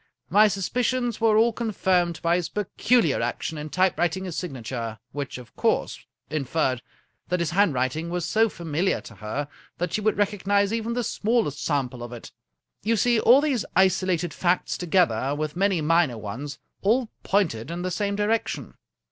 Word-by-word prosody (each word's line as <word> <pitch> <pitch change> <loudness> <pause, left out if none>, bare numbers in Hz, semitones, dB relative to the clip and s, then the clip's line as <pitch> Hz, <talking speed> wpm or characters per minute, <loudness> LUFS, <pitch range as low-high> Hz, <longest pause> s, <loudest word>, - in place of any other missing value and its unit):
My 210 +3 +7
suspicions 240 +4 -1
were 220 -2 +4
all 230 +1 +4
confirmed 185 -7 0
by 170 +1 +3
his 180 -2 -1
peculiar 210 - +1
action 120 +6 -2
in 150 +1 -6
typewriting 175 0 +1
his 180 -3 -5
signa 135 -10 -5
ture, 115 -2 -4
which, 140 -2 -5
of 125 -2 -13
course, - - 0 0.2
inferred 135 -3 -1 0.5
that 180 - 0
his 170 -1 -1
handwriting 160 -4 +1
was 175 -1 -2
60 - - -4
A. - - -5
Conan 220 - +5
Doyle 225 - +3
so - - -16
familiar 170 +2 -1
to 110 - -12
her 110 +8 -4 0.3
that 175 -1 -2
she 215 - 0
would 215 +1 +1
recognize 200 0 +1
even 230 0 -1
the 245 0 -1
smallest 215 - 0
sample 125 -4 -1
of 120 0 -7
it. 120 - -9 0.5
You 225 +2 +1
see 240 +2 +3
all 250 +6 +6
these 275 -7 0
isolated 185 -2 +2
facts, 180 0 0
together 160 -7 +1
with 155 +1 -3
many 190 -2 +2
minor 155 -5 +2
ones, 130 +7 -6 0.2
all 230 +4 +2
pointed 160 - 0
in 175 +1 -4
the 185 - -2
same 200 +2 -1
direction." 210 +2 -1
180 Hz, 180 wpm, -25 LUFS, 145-210 Hz, 0.5 s, My